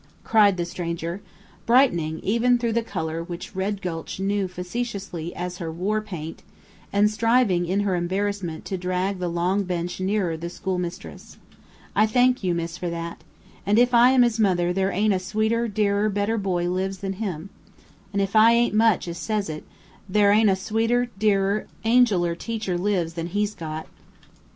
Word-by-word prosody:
cried 205 -4 +4
the 175 - -1
stranger, 170 +1 -4 0.5
brightening 175 - +3
even 235 +4 +2
through 235 -1 -1
the 235 - +2
color 165 -6 -4
which 175 +2 -8
Red 195 +1 -2
Gulch 165 0 -5
knew 195 0 0
facetiously 180 -2 -5
as 180 0 -5
her 165 -2 -4
"war 200 +6 -1
paint," 165 -7 -7 0.5
and 205 +1 +4
striving, 215 -5 +2
in 195 +3 +1
her 200 -2 0
embarrassment, 185 -1 -2
to 190 - -3
drag 185 +2 -1
the 180 - -2
long 175 +4 0
bench 180 -1 -3
nearer 190 -3 0
the 170 +2 -5
schoolmistress. 180 -1 -5 0.6
"I 215 - +4
thank 250 +1 +3
you, 180 -2 +1
miss, 170 0 -4
for 175 - -2
that! 170 0 -6 0.4
and 205 +2 +2
if 245 +1 +4
I 240 +1 +7
am 260 -1 +5
his 235 -2 +1
mother, 180 -4 +2
there 190 +1 +1
ain't 205 +2 +2
a 185 - 0
sweeter, 220 +5 0
dearer, 205 0 +1
better 205 +2 0
boy 180 -3 -1
lives 190 +2 -2
than 195 +1 -4
him. 190 -3 -4 0.6
And 200 0 +1
if 195 +2 -4
I 220 +2 +7
ain't 235 -1 +2
much 220 -4 +3
as 170 0 -5
says 210 -4 -2
it, 155 - -7 0.5
thar 205 0 +4
ain't 215 0 +5
a 190 - +3
sweeter, 230 +5 0
dearer, 205 -1 +1 0.2
angeler 220 -7 +3
teacher 215 0 -3
lives 175 -3 0
than 165 0 -4
he's 205 +3 -1
got." 155 -3 -6
195 Hz, 175 wpm, -24 LUFS, 175-215 Hz, 0.6 s, I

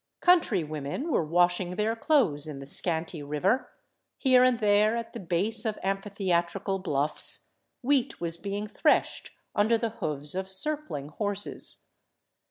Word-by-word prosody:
Country 330 - +4
women 155 - -4
were 170 - +2
washing 175 +2 +2
their 215 +3 0
clothes 225 - +1
in 150 -2 -6
the 135 - -8
scanty 160 +2 -1
river; 150 - 0 0.5
here 255 -2 +5
and 255 -1 +4
there, 210 +1 +3
at 230 -1 -6
the - - -6
base 190 +6 +1
of 220 -3 -2
amphitheatrical 195 -1 -1
bluffs, 150 -5 -1 0.3
wheat 270 0 +1
was 170 -1 0
being 200 +4 -4
threshed 210 - +1 0.2
under 220 +3 +3
the 230 0 -1
hoofs 150 -8 -1
of 190 +1 -3
circling 285 - 0
horses. 205 +4 -3
195 Hz, 140 wpm, -28 LUFS, 165-225 Hz, 0.5 s, here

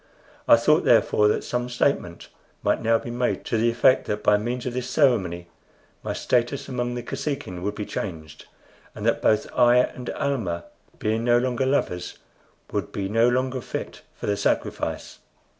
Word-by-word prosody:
I - - +9
thought, - - +3
therefore, 105 - +4
that 105 - +1
some 125 0 -2
statement 120 -8 -1 0.4
might - - +1
now 115 0 +3
be 120 - -7
made 120 +1 -1
to - - -1
the 115 +1 +3
effect 120 +2 +3
that 105 0 -3
by 105 - +5
means 120 +4 -2
of 125 - -3
this 125 0 -3
ceremony 100 - +1 0.5
my - - -4
status 125 +2 0
among 120 -2 -2
the 120 - -4
Kosekin 115 - -4
would 100 +3 -3
be 105 - -4
changed, 80 -6 -6 0.5
and - - -6
that - - +2
both 110 -1 +3
I 120 -1 +5
and 125 0 0
Almah, 115 - -2 0.3
being 110 +1 -1
no 120 0 +4
longer 125 +1 0
lovers, 90 -10 -1 0.5
would - - -3
be 95 -1 -3
no 115 +3 +4
longer 130 +1 -1
fit - - -6
for - - -7
the 100 - +1
sacrifice. - - -2
120 Hz, 175 wpm, -24 LUFS, 105-125 Hz, 0.5 s, I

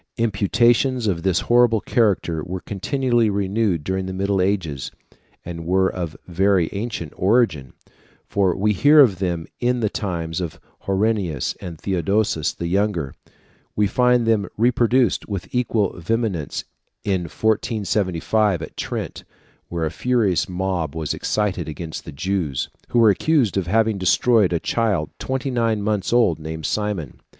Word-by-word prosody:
Imputations 120 +3 +2
of 90 -5 0
this 95 -1 +1
horrible 120 -2 +4
character 100 -8 +1
were 90 +3 -5
continually 120 +3 0
renewed 100 -3 0
during 95 +2 -2
the 95 - -4
Middle 100 0 0
Ages, 90 -8 -1 0.6
and 85 -1 -6
were 95 +1 +3
of 85 -4 -5
very 90 -1 +2
ancient 100 -7 -4
origin; 95 - +1 0.5
for 95 -3 +1
we 105 +2 +2
hear 145 +9 +5
of 110 -10 +6
them 85 -3 -2
in 125 0 +1
the 110 -2 0
times 85 -3 -3
of 85 -4 -5 0.3
Honorius 100 - 0
and 85 -3 -7
Theodosius 95 -3 0
the 85 - -6
younger; 90 -5 0 0.6
we 105 - +3
find 125 +3 +3
them 110 -3 +2
reproduced 120 0 +2
with 100 -3 -4
equal 115 -5 +1
vehemence 100 - -2 0.4
in 95 -3 0
1475 105 -2 0
at - - -9
Trent, - - -5 0.4
where 85 -1 -2
a 80 - -2
furious 105 +1 +1
mob 90 -4 -2
was 80 -3 -2
excited 95 -6 -1
against 80 +1 -6
the - - -7
Jews, 80 -3 -2 0.2
who - - -1
were 115 -3 +7
accused 135 0 +1
of 95 -3 -1
having 110 +1 +2
destroyed 100 +2 +3
a 85 - +1
child 105 -6 0
twenty 130 +1 -2
nine 115 -4 0
months 105 -2 -1
old 115 -10 +3
named 80 0 -6
Simon. 105 - -3
100 Hz, 145 wpm, -22 LUFS, 85-115 Hz, 0.6 s, were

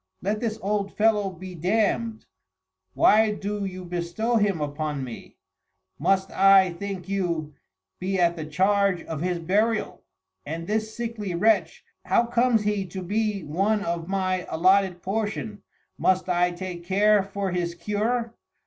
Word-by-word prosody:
Let 210 +3 0
this 225 -1 -2
old 200 0 -1
Fellow 210 -2 +3
be 185 0 -9
Damm'd, 220 +5 0 0.7
why 215 0 +5
do 205 0 -3
you 185 -1 -6
bestow 175 +7 -1
him 205 -5 +1
upon 150 -1 -3
me; 120 -3 -9 0.6
must 195 0 +1
I, 195 -2 +5
think 190 0 -6
you; 170 -6 -2 0.5
be 190 +1 -1
at 170 -1 +3
the 155 -2 -6
charge 195 +2 +2
of 160 -2 -5
his 180 0 0
Burial? 210 +6 0 0.4
And 165 +3 -5
this 220 +2 -2
sickly 225 -6 -4
Wretch, 190 -3 +1 0.2
how 235 - +3
comes 235 -2 +2
he 205 -2 -1
to 185 +2 -6
be 210 +1 -1
one 195 +7 0
of 170 -1 -3
my 185 -1 -1
alloted 185 +1 +2
portion 210 +1 -3 0.4
must 185 -1 +2
I 180 0 +2
take 175 -1 -6
care 205 +3 +4
for 195 0 -3
his 175 -1 -2
cure? 220 +6 -1
195 Hz, 145 wpm, -25 LUFS, 175-210 Hz, 0.7 s, why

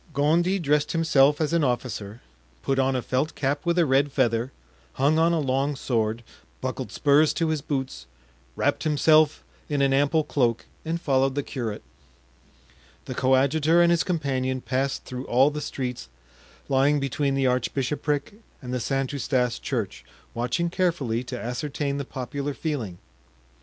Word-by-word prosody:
Gondy 170 +7 +2
dressed 150 -4 +1
himself 150 -3 +4
as 155 0 0
an 170 -2 +3
officer, 120 -4 -3 0.4
put 135 0 0
on 135 0 +2
a 125 - -1
felt 130 +5 -1
cap 140 +1 -1
with 170 +1 +2
a 170 - +4
red 140 +1 +2
feather, 120 -1 +1 0.4
hung 145 +4 +2
on 165 +1 +4
a 170 - +1
long 140 +1 0
sword, 115 -3 -1 0.4
buckled - - -4
spurs 145 +2 +3
to 165 -1 0
his 155 -2 -1
boots, 130 - -4 0.5
wrapped - - 0
himself 155 0 +3 0.3
in 145 -2 0
an 135 0 +3
ample 145 +3 +3
cloak 120 -6 0 0.2
and 165 +1 -2
followed 135 -3 +1
the 145 - -1
curate. 115 -6 -5 1.2
The - - -5
coadjutor 140 +5 +3
and 170 0 +5
his 170 0 +3
companion 135 -7 -1
passed 130 +2 -2
through 125 +1 -6
all 130 +4 +4
the 150 0 -5
streets 125 - -5 0.6
lying 140 +2 +3
between 140 0 -1
the 135 -1 +1
archbishopric 140 - -1 0.3
and 125 -2 -7
the 125 - 0
St. 135 +2 -1
Eustache 125 -3 0
Church, 115 -8 -3 0.3
watching 170 +9 -1
carefully 150 -11 0
to 125 -1 -5
ascertain 140 +3 -3
the 140 - -4
popular 135 +3 -4
feeling. 125 - -3
140 Hz, 155 wpm, -25 LUFS, 130-150 Hz, 1.2 s, and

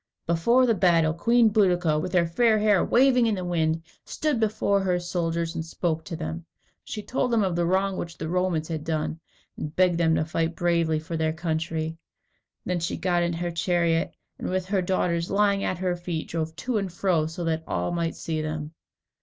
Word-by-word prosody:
Before 235 +10 +3
the 235 - +3
battle, 170 -5 +3
Queen 230 +7 +4
Boadicea, 180 -7 +2
with 180 - -5
her 175 -2 +4
fair 220 +6 +3
hair 210 -3 +3
waving 250 -1 +4
in 220 - +1
the 185 -2 -4
wind, 165 -2 0 0.2
stood 300 -6 -1
before 205 -2 +1
her 180 -2 +1
soldiers 170 -1 -2
and 160 - -3
spoke 165 0 -2
to 170 - -5
them. 160 +1 -5 0.4
She 210 - -6
told 250 +2 -1
them 230 -3 +2
of 185 -3 0
the 170 0 +1
wrong 190 +1 +1
which 170 -1 -5
the - - -4
Romans 175 -2 0
had 160 -3 -4
done, 160 0 -2 0.4
and 150 0 -6
begged 180 -2 +3
them 160 -1 +3
to 155 - +1
fight 165 +1 -1
bravely 170 -2 +1
for 160 +2 -5
their 160 0 0
country. 160 -1 -3 0.7
Then 180 -1 -1
she 165 - -2
got 175 0 +1
into 170 -1 -1
her 175 0 -2
chariot, 170 0 0 0.2
and - - -3
with 185 0 -1
her 195 0 0
daughters 175 -2 0
lying 200 0 +2
at 185 - -1
her 180 0 -1
feet, 175 -2 -4
drove 160 -1 -3
to 220 +7 -1
and 195 -2 -3
fro, 175 -3 +1
so 165 +2 -6
that 160 -1 -1
all 90 0 -1
might 170 -1 -1
see 160 -1 -3
them. 155 0 -4
170 Hz, 205 wpm, -26 LUFS, 160-190 Hz, 0.7 s, Queen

